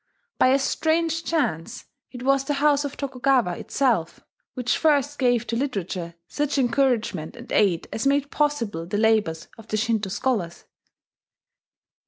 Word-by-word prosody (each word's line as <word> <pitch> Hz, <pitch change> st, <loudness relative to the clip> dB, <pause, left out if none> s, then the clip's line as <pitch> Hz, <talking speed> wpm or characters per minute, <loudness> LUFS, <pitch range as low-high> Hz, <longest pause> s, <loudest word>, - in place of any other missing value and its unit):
By -, -, +5 dB
a 265 Hz, +1 st, +5 dB
strange 325 Hz, +3 st, 0 dB
chance, 240 Hz, -, -2 dB, 0.2 s
it 245 Hz, -1 st, -9 dB
was 275 Hz, 0 st, +3 dB
the 290 Hz, -, -1 dB
house 290 Hz, 0 st, +3 dB
of 285 Hz, -, -5 dB
Tokugawa 255 Hz, -8 st, +1 dB
itself 235 Hz, -12 st, 0 dB, 0.4 s
which 250 Hz, -1 st, 0 dB
first 290 Hz, -2 st, +2 dB
gave 245 Hz, -3 st, +2 dB
to 230 Hz, -, -3 dB
literature 185 Hz, -9 st, -3 dB
such 295 Hz, -1 st, -1 dB
encouragement 245 Hz, -, 0 dB
and 240 Hz, +1 st, -11 dB
aid 185 Hz, -5 st, +2 dB
as 225 Hz, +4 st, -1 dB
made 280 Hz, 0 st, +1 dB
possible 230 Hz, -, -1 dB
the 205 Hz, -, -2 dB
labours 215 Hz, -7 st, +1 dB
of 225 Hz, -, -13 dB
the 215 Hz, -, -1 dB
Shinto 215 Hz, -2 st, 0 dB
scholars. 190 Hz, -6 st, -2 dB
250 Hz, 145 wpm, -24 LUFS, 215-280 Hz, 0.4 s, By